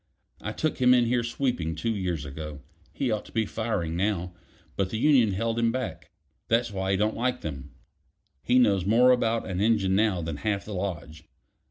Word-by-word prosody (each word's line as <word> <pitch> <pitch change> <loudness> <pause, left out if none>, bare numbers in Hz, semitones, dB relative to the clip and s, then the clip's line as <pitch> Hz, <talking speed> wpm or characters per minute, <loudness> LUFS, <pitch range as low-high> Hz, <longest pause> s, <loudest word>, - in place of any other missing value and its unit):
"I - - -4
took 155 -2 -2
him 125 0 +6
in 120 -1 +4
here 120 +1 +1
sweeping 115 -9 -2
two 110 +8 -1
years 90 -6 -2
ago. 75 0 -7 0.3
He 130 -4 -1
ought 105 -1 -1
to - - -14
be 110 -1 0
firing 105 -8 -2
now, 90 -1 -1 0.4
but 95 -1 0
the 110 - -3
union 120 -5 +4
held 115 +3 -1
him 115 0 +2
back; 130 0 -5 0.4
that's 115 0 +1
why 95 0 -2
he 95 - +2
don't 105 +2 +1
like 125 +1 -1
them. 70 -2 -7 0.7
He 125 - +2
knows 100 -7 +4
more 120 +6 +5
about 115 -2 +1
an 95 0 -2
engine 105 -4 +2
now 100 -4 +2
than 80 -2 -4
half 100 +2 -2
the 105 - -6
lodge. 90 -5 -5
105 Hz, 195 wpm, -27 LUFS, 90-115 Hz, 0.7 s, him